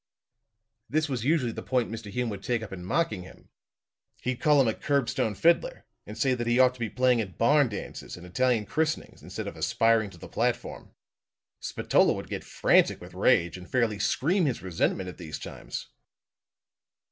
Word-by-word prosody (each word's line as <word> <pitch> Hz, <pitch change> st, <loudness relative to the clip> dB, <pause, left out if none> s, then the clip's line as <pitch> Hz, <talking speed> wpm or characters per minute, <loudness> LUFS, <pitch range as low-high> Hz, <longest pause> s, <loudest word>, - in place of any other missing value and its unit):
"This 155 Hz, +2 st, +1 dB
was 130 Hz, -5 st, -3 dB
usually 140 Hz, -5 st, +2 dB
the -, -, -6 dB
point 125 Hz, -4 st, 0 dB
Mr. 110 Hz, -2 st, -6 dB
Hume 125 Hz, +3 st, -2 dB
would 100 Hz, -2 st, -6 dB
take 120 Hz, 0 st, -1 dB
up 105 Hz, -, -8 dB
in 90 Hz, -2 st, -7 dB
mocking 160 Hz, -, 0 dB
him. 90 Hz, -, -14 dB, 0.7 s
He'd 125 Hz, 0 st, -2 dB
call 150 Hz, -2 st, +5 dB
him 130 Hz, -, +4 dB
a 110 Hz, -, +2 dB
curbstone 130 Hz, -7 st, 0 dB
fiddler, 170 Hz, -, +2 dB, 0.2 s
and -, -, -8 dB
say 135 Hz, -2 st, +2 dB
that 120 Hz, -2 st, -2 dB
he 120 Hz, +1 st, +3 dB
ought 130 Hz, -1 st, +5 dB
to 125 Hz, -, -17 dB
be 115 Hz, -2 st, -2 dB
playing 125 Hz, -1 st, +2 dB
at 95 Hz, -4 st, -7 dB
barn 140 Hz, +2 st, +4 dB
dances 100 Hz, -3 st, -7 dB
and 90 Hz, -, -11 dB
Italian 115 Hz, +4 st, +1 dB
christenings 160 Hz, +6 st, -2 dB
instead -, -, -6 dB
of -, -, -6 dB
aspiring 115 Hz, -2 st, +2 dB
to -, -, -14 dB
the -, -, -10 dB
platform. -, -, -2 dB, 0.6 s
Spatola -, -, +2 dB
would -, -, -7 dB
get -, -, -4 dB
frantic -, -, +3 dB
with -, -, -12 dB
rage, 85 Hz, +1 st, +2 dB
and 90 Hz, -, -12 dB
fairly 115 Hz, -5 st, +1 dB
scream 175 Hz, +6 st, +1 dB
his 125 Hz, -, -2 dB
resentment 90 Hz, +1 st, -1 dB
at 90 Hz, -, -9 dB
these 80 Hz, -3 st, -6 dB
times. -, -, -7 dB
120 Hz, 185 wpm, -27 LUFS, 105-135 Hz, 0.7 s, call